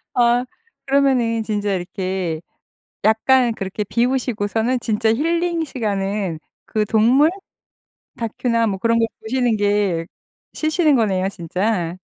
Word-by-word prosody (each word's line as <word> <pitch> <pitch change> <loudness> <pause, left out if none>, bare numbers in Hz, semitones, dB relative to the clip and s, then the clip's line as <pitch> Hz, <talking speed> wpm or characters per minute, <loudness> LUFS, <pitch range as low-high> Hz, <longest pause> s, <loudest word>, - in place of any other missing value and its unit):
아 240 0 +3 0.4
그러면은 260 -5 +2
진짜 210 -2 -1
이렇게 185 -2 -3 0.6
약간 235 +3 +4
그렇게 195 0 -4
비우시고서는 235 0 0
진짜 225 -1 0
힐링 335 +5 0
시간은 200 - -2 0.3
그 215 -1 -1
동물? 240 +9 +4 0.9
다큐나 230 0 0
뭐 195 -2 -1
그런 230 +3 +2
걸 230 - +2
보시는 240 -1 0
게 205 -5 +1 0.5
쉬시는 310 -1 +2
거네요 195 -5 +1
진짜. 180 0 -2
225 Hz, 250 characters per minute, -20 LUFS, 200-250 Hz, 0.9 s, 약간